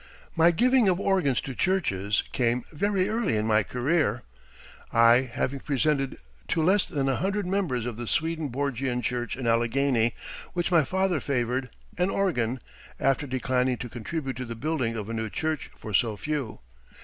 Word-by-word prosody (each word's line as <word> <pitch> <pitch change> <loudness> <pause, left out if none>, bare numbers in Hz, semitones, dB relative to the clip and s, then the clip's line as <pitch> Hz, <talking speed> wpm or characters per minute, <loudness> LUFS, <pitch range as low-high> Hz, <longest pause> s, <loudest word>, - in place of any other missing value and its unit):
] - - -26
My 165 +1 +6
giving 245 +4 +4
of 180 0 +1
organs 185 -10 +2
to 135 - -6
churches 105 - +1
came 120 -1 +1
very 195 +3 +1
early 215 - 0
in 105 - 0
my 110 -1 +4
career, 125 0 0 0.7
I 115 +2 +5
having 135 +3 -2
presented 140 0 0 0.3
to 160 - +1
less 190 +4 +3
than 140 -2 -1
a 135 -2 +1
hundred 195 +2 -1
members 180 - -1
of 120 -3 -4
the 120 -1 -5
Swedenborgian 140 -5 -1
Church 120 -2 -2
in 130 - -4
Allegheny 120 0 +2 0.4
which 175 +1 -1
my 170 -3 +5
father 190 +2 0
favored, 125 -1 -1 0.3
an 180 +2 +2
organ, 130 - 0 0.4
after 135 +2 +1
declining 130 -1 0
to 120 - -6
contribute 130 +3 -4
to 130 - -4
the 115 -1 -6
building 130 -3 -1
of 105 -2 -4
a 115 - -4
new 110 -1 -2
church 155 +5 -2
for 110 - -7
so 110 +1 +2
few. 140 - -3
135 Hz, 170 wpm, -27 LUFS, 120-165 Hz, 0.7 s, My